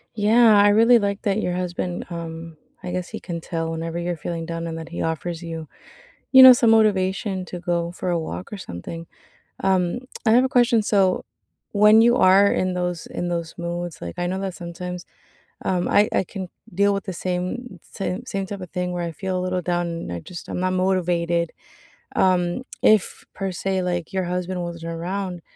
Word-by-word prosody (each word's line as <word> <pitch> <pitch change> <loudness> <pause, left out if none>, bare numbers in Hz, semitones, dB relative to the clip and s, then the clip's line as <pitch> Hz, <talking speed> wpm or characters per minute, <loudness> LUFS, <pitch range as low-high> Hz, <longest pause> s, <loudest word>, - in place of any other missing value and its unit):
Yeah, 220 +1 +5
I 205 - +6
really 230 +3 +6
like 200 0 -2
that 205 +1 +1
your 180 - -1
husband, 180 0 -3
um, 165 -1 -7 0.3
I 180 - -4
guess 180 0 -3
he - - -6
can 170 -1 -6
tell 165 -1 -3
whenever 165 +1 -4
you're 175 0 -2
feeling 165 +1 -4
down, 165 0 -4
and 165 0 -5
that 160 0 -8
he 170 - -5
offers 165 +1 -3
you, 165 -2 -6 0.7
you 265 -1 +10
know, 260 0 +12
some 235 -2 +4
motivation 195 -3 +2
to 180 - -7
go 170 -1 -1
for 180 0 -3
a 170 - +1
walk 165 +4 -6
or 210 - -4
something. 165 - -8 0.6
Um, 190 +2 +1 0.2
I 220 - +4
have 245 +3 +6
a - - +1
question. 240 -3 +3
So, 195 -3 +2 0.5
when 210 +1 +6
you 240 +2 +5
rare 195 +2 +6
in 185 0 0
those 180 -2 -3
in 175 - -4
those 170 -2 -3
moods, 175 0 -4
like, 85 -1 -6
I 175 - 0
know 185 +2 -2
that 190 -2 -3
sometimes, 175 +1 -6 0.6
um, 180 -1 0
I 205 +1 +4
I - - +2
can 190 0 -7 0.3
deal 200 +2 +3
with 195 - -3
the 190 - -4
same 185 +8 -4
same 190 -3 -5
same 195 0 -3
type 195 0 -7
of 180 - -8
thing 180 -1 -2
where 175 -1 -3
I 170 - -3
feel 185 +3 -3
a - - -2
little 185 0 -1
down, 175 0 -1
and 165 - -5
I 85 - -4
just 175 - -10
I'm - - -4
not 185 0 0
motivated. 175 -2 +1 0.7
Um, 180 +4 +2 0.2
if, 215 -4 +3
per 195 -1 -3
se, 190 +1 -1
like, 175 0 -3
your 190 -1 -1
husband 180 +1 -3
wasn't 170 -1 -6
around, 180 +1 -4
180 Hz, 200 wpm, -23 LUFS, 170-195 Hz, 0.7 s, know